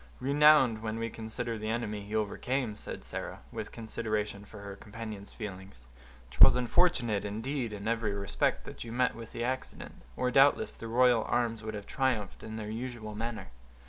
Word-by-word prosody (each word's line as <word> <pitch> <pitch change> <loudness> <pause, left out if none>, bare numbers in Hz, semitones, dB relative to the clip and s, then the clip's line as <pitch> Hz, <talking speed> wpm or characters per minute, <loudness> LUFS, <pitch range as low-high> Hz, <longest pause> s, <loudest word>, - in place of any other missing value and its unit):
"Renowned, 140 -4 +5
when 110 0 -3
we 115 0 -2
consider 115 +1 -4
the 110 +1 -3
enemy 110 -2 -2
he 105 +2 -6
overcame," 110 +2 -1
said - - -6
Sarah, - - -6
with - - -5
consideration 110 -2 -3
for 105 0 -11
her 100 -1 -7
companion's 105 0 -8
feelings. 95 - -8 0.5
"'Twas 65 - +8
unfortunate, 120 - +2
indeed, 115 +4 -2
in 105 0 -5
every 110 -3 0
respect, 100 0 0
that - - -7
you 115 - -7
met 125 +1 +2
with 115 0 -9
the 120 - -3
accident, 130 +2 -4 0.2
or 125 0 +1
doubtless 135 +2 +5
the 115 - -7
royal 120 -1 +4
arms 115 -2 0
would 110 0 -5
have 100 -1 -6
triumphed 125 -7 -1
in 110 0 -7
their 105 -1 -4
usual 115 -2 -5
manner." 110 -2 -4
110 Hz, 175 wpm, -31 LUFS, 105-120 Hz, 0.5 s, Twas